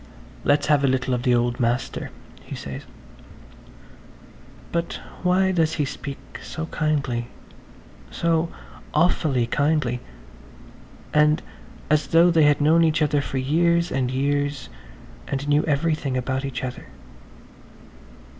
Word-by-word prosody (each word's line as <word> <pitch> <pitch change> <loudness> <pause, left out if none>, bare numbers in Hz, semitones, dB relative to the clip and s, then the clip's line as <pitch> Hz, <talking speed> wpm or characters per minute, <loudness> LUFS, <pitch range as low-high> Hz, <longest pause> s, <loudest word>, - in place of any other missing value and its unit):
"Let's 145 +1 +3
have 145 -2 +3
a - - +4
little 130 0 0
of 125 - 0
the 125 -1 +3
old 120 0 0
master," 125 +2 -1 0.3
he - - -7
says. 70 -1 -7 1.8
But 170 0 -2 0.2
why 185 +1 +3
does 165 -3 +1
he 150 - 0
speak 135 0 -8
so 160 - -5
kindly–so 155 +3 -3 0.5
awfully 150 -6 +2
kindly–and 125 - -2 0.5
as 150 -2 +3
though 170 +4 +5
they 160 -2 +5
had 145 0 +4
known 160 +3 +4
each 160 -1 +2
other 145 -1 +2
for 135 - -4
years 170 +5 +2
and 130 -1 0
years 140 0 -1 0.6
and 140 +1 -3
knew 145 +1 +3
everything 150 -3 0
about 130 +2 -2
each 135 -2 -4
other. 125 -1 -6
145 Hz, 115 wpm, -23 LUFS, 130-160 Hz, 1.8 s, though